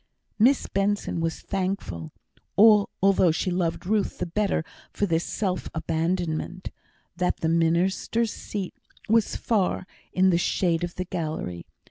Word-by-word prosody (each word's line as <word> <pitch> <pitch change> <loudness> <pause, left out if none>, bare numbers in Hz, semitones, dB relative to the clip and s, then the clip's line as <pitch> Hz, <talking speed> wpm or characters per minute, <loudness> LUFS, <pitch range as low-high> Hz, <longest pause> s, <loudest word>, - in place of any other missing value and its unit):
Miss 255 +5 +4
Benson 200 -2 0
was 165 0 -2
thankful 185 - -3 0.5
(although 200 -3 +5
she 175 +3 0
loved 175 -1 -1
Ruth 205 +1 0
the - - -2
better 185 -2 0 0.3
for 205 - 0
this 165 -3 +1
self 185 -4 -2
abandonment) 165 +2 -2 0.4
that 180 +1 -1
the 160 - +1
minister's 175 +7 +1
seat 195 -3 -5 0.3
was 225 0 +3
far 200 -5 0 0.3
in 185 0 +4
the 170 - +3
shade 175 -1 +1
of 175 0 -4
the 185 - -3
gallery. 155 - -4
180 Hz, 130 wpm, -26 LUFS, 165-200 Hz, 0.5 s, although